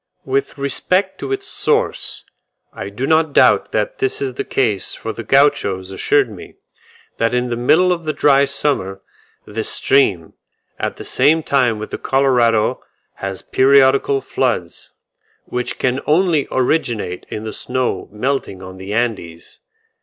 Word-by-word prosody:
With 410 Hz, -, -1 dB
respect 180 Hz, +8 st, -1 dB
to -, -, -5 dB
its 400 Hz, 0 st, -2 dB
source, 455 Hz, +3 st, -1 dB, 0.5 s
I 100 Hz, -, -6 dB
do 105 Hz, +6 st, -4 dB
not 160 Hz, 0 st, +2 dB
doubt -, -, +4 dB
that -, -, -2 dB
this 400 Hz, -1 st, 0 dB
is 135 Hz, -2 st, -2 dB
the -, -, -3 dB
case 110 Hz, -7 st, -1 dB
for 110 Hz, -, -5 dB
the 115 Hz, -, -6 dB
Gauchos 110 Hz, -8 st, +2 dB
assured 135 Hz, +7 st, +2 dB
me, 105 Hz, -5 st, -12 dB, 0.6 s
that 115 Hz, +2 st, +1 dB
in 125 Hz, 0 st, 0 dB
the 120 Hz, -, -1 dB
middle 160 Hz, +10 st, +3 dB
of 170 Hz, -2 st, -6 dB
the 155 Hz, -, 0 dB
dry 140 Hz, -2 st, +4 dB
summer, 115 Hz, -9 st, -2 dB, 0.4 s
this 110 Hz, +1 st, -3 dB
stream, 100 Hz, -12 st, +1 dB, 0.5 s
at -, -, -2 dB
the -, -, -9 dB
same 155 Hz, +5 st, +3 dB
time 125 Hz, -7 st, +2 dB
with 110 Hz, -, -7 dB
the -, -, -5 dB
Colorado 120 Hz, -5 st, +2 dB, 0.4 s
has 95 Hz, -1 st, -5 dB
periodical 135 Hz, 0 st, +3 dB
floods; -, -, -2 dB, 0.5 s
which 125 Hz, 0 st, -3 dB
can 130 Hz, +1 st, 0 dB
only 160 Hz, -2 st, +2 dB
originate 120 Hz, -, -1 dB
in 105 Hz, -, -5 dB
the 110 Hz, -, -5 dB
snow 125 Hz, -7 st, -2 dB
melting 105 Hz, -4 st, -3 dB
on 95 Hz, 0 st, -10 dB
the 95 Hz, +2 st, -7 dB
Andes. 100 Hz, -9 st, -3 dB
130 Hz, 150 wpm, -18 LUFS, 105-145 Hz, 0.6 s, doubt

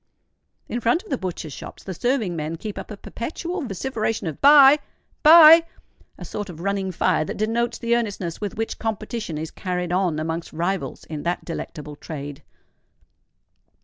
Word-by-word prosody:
In 240 Hz, -, -3 dB
front 240 Hz, -, +1 dB
of 435 Hz, -, -14 dB
the 270 Hz, -, +1 dB
butchers' 170 Hz, -5 st, -5 dB
shops -, -, -10 dB
the 190 Hz, -, -5 dB
serving 225 Hz, -3 st, -1 dB
men 155 Hz, +1 st, -3 dB
keep 210 Hz, +5 st, -6 dB
up -, -, -9 dB
a 210 Hz, -, -7 dB
perpetual 335 Hz, -, -5 dB
vociferation 225 Hz, -, -3 dB
of 160 Hz, -3 st, -5 dB
"Buy! 285 Hz, 0 st, +8 dB, 0.4 s
buy!"—a 330 Hz, +1 st, +5 dB
sort 205 Hz, -2 st, -5 dB
of 165 Hz, -3 st, -9 dB
running 195 Hz, +1 st, -1 dB
fire 160 Hz, -, +1 dB
that -, -, -6 dB
denotes 230 Hz, +2 st, 0 dB
the 235 Hz, 0 st, +1 dB
earnestness 200 Hz, -7 st, -3 dB
with 205 Hz, -2 st, -4 dB
which 225 Hz, 0 st, -3 dB
competition 215 Hz, -5 st, -4 dB
is 160 Hz, +1 st, -5 dB
carried 180 Hz, -2 st, -3 dB
on 180 Hz, -3 st, +1 dB
amongst 160 Hz, +2 st, -4 dB
rivals 175 Hz, +4 st, -3 dB
in 155 Hz, -2 st, -6 dB
that 175 Hz, +3 st, -2 dB
delectable 150 Hz, -3 st, -6 dB
trade. 145 Hz, -2 st, -7 dB
200 Hz, 160 wpm, -23 LUFS, 165-235 Hz, 0.4 s, Buy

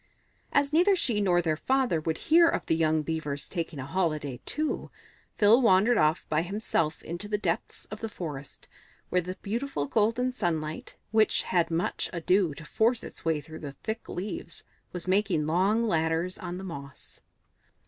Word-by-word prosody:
As 285 Hz, +1 st, +2 dB
neither 365 Hz, +5 st, +5 dB
she 235 Hz, -, +1 dB
nor 175 Hz, -3 st, +3 dB
their 160 Hz, -2 st, +1 dB
father 255 Hz, -3 st, +1 dB
would 160 Hz, 0 st, -1 dB
hear 335 Hz, +2 st, +5 dB
of -, -, 0 dB
the 160 Hz, -, +2 dB
young 155 Hz, -1 st, +2 dB
Beavers 150 Hz, -3 st, -2 dB
taking 165 Hz, -3 st, -4 dB
a 130 Hz, -, -5 dB
holiday 150 Hz, -5 st, -1 dB
too, 310 Hz, 0 st, -2 dB, 0.5 s
Phil 220 Hz, +4 st, +6 dB
wandered 220 Hz, +1 st, +5 dB
off 155 Hz, +2 st, +2 dB
by 155 Hz, 0 st, +1 dB
himself 175 Hz, -4 st, -1 dB
into 175 Hz, +5 st, -4 dB
the 210 Hz, 0 st, 0 dB
depths 175 Hz, -5 st, -3 dB
of 215 Hz, -, -6 dB
the 225 Hz, -, -3 dB
forest, 150 Hz, -8 st, -7 dB, 0.4 s
where 180 Hz, -, +2 dB
the 185 Hz, +2 st, -6 dB
beautiful 225 Hz, -, -2 dB
golden 230 Hz, -, +1 dB
sunlight, 160 Hz, -8 st, -3 dB, 0.2 s
which 220 Hz, -1 st, +3 dB
had 175 Hz, -2 st, +1 dB
much 165 Hz, +1 st, -1 dB
ado 175 Hz, -1 st, +2 dB
to 165 Hz, -, -10 dB
force 230 Hz, +8 st, +1 dB
its -, -, -9 dB
way 160 Hz, -2 st, +1 dB
through 160 Hz, +2 st, -10 dB
the 145 Hz, -3 st, -7 dB
thick 220 Hz, +1 st, -4 dB
leaves, 180 Hz, -2 st, -4 dB, 0.3 s
was 180 Hz, 0 st, -4 dB
making 185 Hz, -5 st, +2 dB
long 190 Hz, +8 st, +2 dB
ladders 165 Hz, 0 st, 0 dB
on 180 Hz, -1 st, -5 dB
the 190 Hz, -, -7 dB
moss. 140 Hz, -7 st, -9 dB
180 Hz, 170 wpm, -28 LUFS, 160-215 Hz, 0.5 s, Phil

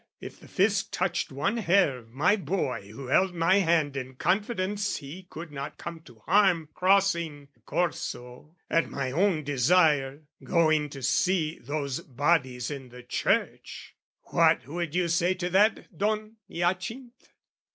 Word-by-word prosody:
if -, -, -10 dB
the -, -, -15 dB
Fisc 200 Hz, 0 st, +1 dB
Touched 180 Hz, -3 st, -1 dB
one 155 Hz, -, -1 dB
hair 190 Hz, -, +3 dB
of 115 Hz, -1 st, -18 dB
my 160 Hz, -, +3 dB
boy 175 Hz, -, -3 dB
who 130 Hz, +5 st, -9 dB
held 180 Hz, +8 st, +2 dB
my 170 Hz, +3 st, +3 dB
hand 165 Hz, -6 st, +2 dB
In 130 Hz, -1 st, -5 dB
confidence 205 Hz, -, -1 dB
he 170 Hz, +7 st, -10 dB
could 165 Hz, 0 st, -8 dB
not 140 Hz, +1 st, -6 dB
come 170 Hz, -1 st, -7 dB
to 120 Hz, -8 st, -18 dB
harm 180 Hz, -5 st, +3 dB
Crossing 170 Hz, -7 st, +1 dB
the 120 Hz, -, -33 dB
Corso, 125 Hz, 0 st, -4 dB
at 165 Hz, -, +1 dB
my 130 Hz, -2 st, -3 dB
own 170 Hz, +1 st, +1 dB
desire, 145 Hz, 0 st, +2 dB, 0.2 s
Going 155 Hz, -3 st, +2 dB
to 135 Hz, -2 st, -9 dB
see 165 Hz, +3 st, +1 dB
those 140 Hz, +1 st, -3 dB
bodies 140 Hz, -4 st, 0 dB
in 135 Hz, -3 st, -7 dB
the 125 Hz, +1 st, -12 dB
church 125 Hz, -, -2 dB, 0.3 s
What -, -, +2 dB
would 170 Hz, +1 st, -4 dB
you 180 Hz, -1 st, +2 dB
say 175 Hz, +2 st, +1 dB
to 180 Hz, -1 st, -3 dB
that, 205 Hz, 0 st, +2 dB
Don 215 Hz, +4 st, -2 dB
Hyacinth? 220 Hz, +9 st, -3 dB
165 Hz, 150 wpm, -27 LUFS, 140-185 Hz, 0.3 s, hair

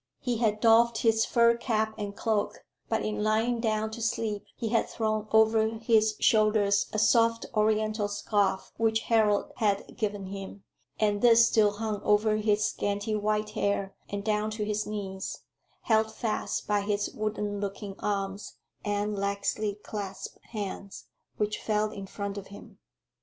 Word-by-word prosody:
He 245 Hz, -2 st, -1 dB
had 215 Hz, -2 st, +1 dB
doffed 230 Hz, 0 st, +4 dB
his 225 Hz, -1 st, +3 dB
fur 235 Hz, -1 st, +4 dB
cap 220 Hz, -2 st, -1 dB
and 205 Hz, -2 st, -5 dB
cloak, 215 Hz, -1 st, -1 dB, 0.2 s
but -, -, 0 dB
in 215 Hz, 0 st, -2 dB
lying 220 Hz, +3 st, +1 dB
down 220 Hz, -1 st, 0 dB
to 230 Hz, +1 st, -7 dB
sleep 220 Hz, -2 st, -1 dB
he 225 Hz, -, -3 dB
had 230 Hz, +1 st, +1 dB
thrown 215 Hz, -1 st, -1 dB
over 220 Hz, 0 st, +5 dB
his 220 Hz, -1 st, +3 dB
shoulders 215 Hz, -2 st, +3 dB
a -, -, -3 dB
soft 230 Hz, +2 st, +3 dB
Oriental 215 Hz, -1 st, +1 dB
scarf 205 Hz, -2 st, 0 dB
which 225 Hz, -1 st, +2 dB
Harold 215 Hz, -3 st, +2 dB
had 205 Hz, -4 st, 0 dB
given 205 Hz, -2 st, -2 dB
him, 195 Hz, +1 st, -8 dB, 0.4 s
and 205 Hz, -1 st, +1 dB
this 230 Hz, -1 st, +7 dB
still 210 Hz, -2 st, +3 dB
hung 210 Hz, -1 st, -3 dB
over 215 Hz, +1 st, +3 dB
his 210 Hz, -1 st, +2 dB
scanty 205 Hz, +1 st, -2 dB
white 210 Hz, 0 st, 0 dB
hair 200 Hz, -1 st, -1 dB, 0.2 s
and 200 Hz, 0 st, -4 dB
down 210 Hz, 0 st, 0 dB
to 215 Hz, -1 st, -3 dB
his 210 Hz, 0 st, -2 dB
knees, 195 Hz, -2 st, -5 dB, 0.4 s
held 220 Hz, -1 st, +2 dB
fast 220 Hz, -1 st, -2 dB
by 205 Hz, -1 st, +2 dB
his 205 Hz, 0 st, -1 dB
wooden 210 Hz, -1 st, -2 dB
looking 200 Hz, 0 st, -5 dB
arms 200 Hz, 0 st, -3 dB, 0.3 s
and 205 Hz, 0 st, -1 dB
laxly 200 Hz, +1 st, -1 dB
clasped 195 Hz, -3 st, -6 dB
hands, 200 Hz, -2 st, -6 dB, 0.3 s
which 210 Hz, 0 st, -1 dB
fell 215 Hz, 0 st, 0 dB
in 195 Hz, -2 st, -7 dB
front 200 Hz, 0 st, -5 dB
of 195 Hz, -, -11 dB
him. 200 Hz, +1 st, -13 dB
215 Hz, 155 wpm, -28 LUFS, 205-220 Hz, 0.4 s, this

